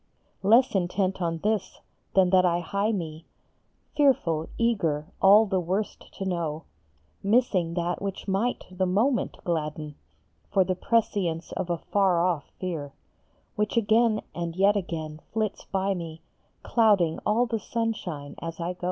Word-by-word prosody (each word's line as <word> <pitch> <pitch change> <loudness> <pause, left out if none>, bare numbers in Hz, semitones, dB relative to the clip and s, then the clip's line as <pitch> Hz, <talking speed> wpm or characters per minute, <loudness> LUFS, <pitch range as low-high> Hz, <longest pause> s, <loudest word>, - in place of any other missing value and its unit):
Less 230 +6 +5
intent 190 0 0
on 165 -1 0
this 210 -2 -1 0.4
than 185 -2 +5
that 185 -1 +6
I 175 -1 +2
hie 200 +5 -1
me, 165 -5 -5 0.7
Fearful, 200 - +2
eager, 170 -11 +1 0.2
all 205 +3 +7
the 190 -2 0
worst 185 +5 -3
to 195 - -3
know, 165 -4 -2 0.6
Missing 195 -6 +2
that 175 0 -1
which 195 0 -5
might 200 +6 0
the 185 0 0
moment 230 +8 +1
gladden, 155 -4 -3 0.6
For 195 -2 +4
the 185 +1 0
prescience 185 -5 0
of 185 -2 -3
a 170 - 0
far 190 0 +2
off 170 -3 +1
fear, 160 -7 -4 0.6
Which 210 +2 -1
again 220 0 +3
and 170 -1 -4
yet 200 +2 +4
again 160 -5 -4
flits 215 -2 -2
by 195 0 0
me, 165 -3 -7 0.4
Clouding 205 -8 +3
all 225 +4 +2
the 230 -2 -2
sunshine 200 -11 -3
as 165 0 -6
I 170 +1 -2
go. 180 - -25
185 Hz, 145 wpm, -26 LUFS, 170-210 Hz, 0.7 s, all